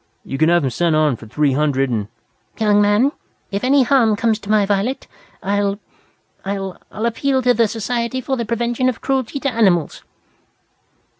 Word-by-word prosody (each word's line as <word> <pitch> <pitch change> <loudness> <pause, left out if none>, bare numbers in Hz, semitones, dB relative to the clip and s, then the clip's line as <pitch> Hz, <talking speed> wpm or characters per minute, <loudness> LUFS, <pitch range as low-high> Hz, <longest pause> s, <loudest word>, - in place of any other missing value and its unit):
You 135 - -5
can 160 +1 +4
have 175 -2 +3
him 130 - -1
sent 170 +4 +1
on 155 -4 +2
for 110 -1 -12
three 145 +5 +1
hundred 135 -2 +1
and 105 -3 -2 0.3
" - - -41
"Young 210 -2 +3
man, 205 +7 +3 0.4
if 200 +2 -3
any 270 +1 +4
harm 240 -4 +3
comes 225 0 0
to 205 - -12
my 210 -1 +3
Violet 205 +6 -1 0.4
I'll 200 0 0 0.7
I'll 195 -1 -4
I'll 215 +2 -3
appeal 260 +3 0
to 250 0 +4
the 230 -1 +2
Society 235 +3 -2
for 260 +1 -2
the 235 - -2
Prevention 235 +3 0
of 245 - -4
Cruelty 265 0 -1
to 275 - 0
Animals!" 190 - +1
210 Hz, 180 wpm, -19 LUFS, 175-240 Hz, 0.7 s, can